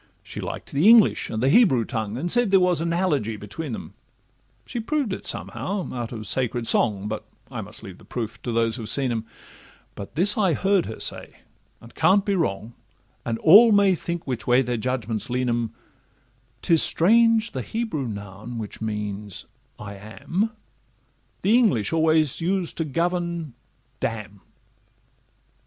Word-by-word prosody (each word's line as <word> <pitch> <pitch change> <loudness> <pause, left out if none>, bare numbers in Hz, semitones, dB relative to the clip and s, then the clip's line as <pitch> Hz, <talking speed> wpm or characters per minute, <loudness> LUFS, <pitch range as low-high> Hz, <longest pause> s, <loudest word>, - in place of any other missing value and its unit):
She - - -7
liked - - -6
the 150 +8 +2
English 230 -2 +5
and 110 +2 -3
the 135 - +4
Hebrew 140 - +5
tongue, 110 -3 -3
And 170 +6 -2
said 240 -3 +3
there 195 0 +5
was 180 -3 +2
analogy 165 - 0
between 115 +6 -6
'em; - - -9 0.7
She 240 - -5
proved 265 -2 -1
it - - -5
somehow 195 -1 -3
out 120 -2 -4
of 110 -3 -6
sacred 120 0 -1
song, 105 -3 +1
But 110 0 -4 0.3
I 120 -4 -4
must 105 +2 -8
leave 95 -4 -10
the - - -16
proofs 115 -3 -5
to 120 - -4
those 115 0 +1
who've 110 -3 -5
seen 130 +1 +1
'em; 115 -1 -3 0.7
But 100 - -9
this 195 +6 +5
I 190 -5 +3
heard 195 +3 +1
her 110 - -7
say, - - -1 0.4
and 115 - -15
can't 200 +1 +3
be 200 - +1
wrong 115 - -2 0.5
And 115 -1 -1
all 210 - +8
may 200 -2 +5
think 170 -1 -4
which 120 -4 -4
way 125 +2 +4
their 120 0 -2
judgments 120 -1 -3
lean 125 +1 -1
'em, 115 -1 -2 0.9
''Tis 165 -3 +4
strange—the 230 +5 +3
Hebrew 220 - -3
noun 100 +2 -7
which 110 -1 -7
means 105 -2 -5 0.3
"I 100 -1 -8
am," 165 - -3 0.9
The 210 +4 +4
English 165 - +1
always 160 -2 +2
use 185 0 -1
to 165 - -2
govern 170 -1 -2 0.5
d - - +1
n. 105 -3 -8
130 Hz, 165 wpm, -24 LUFS, 110-185 Hz, 0.9 s, all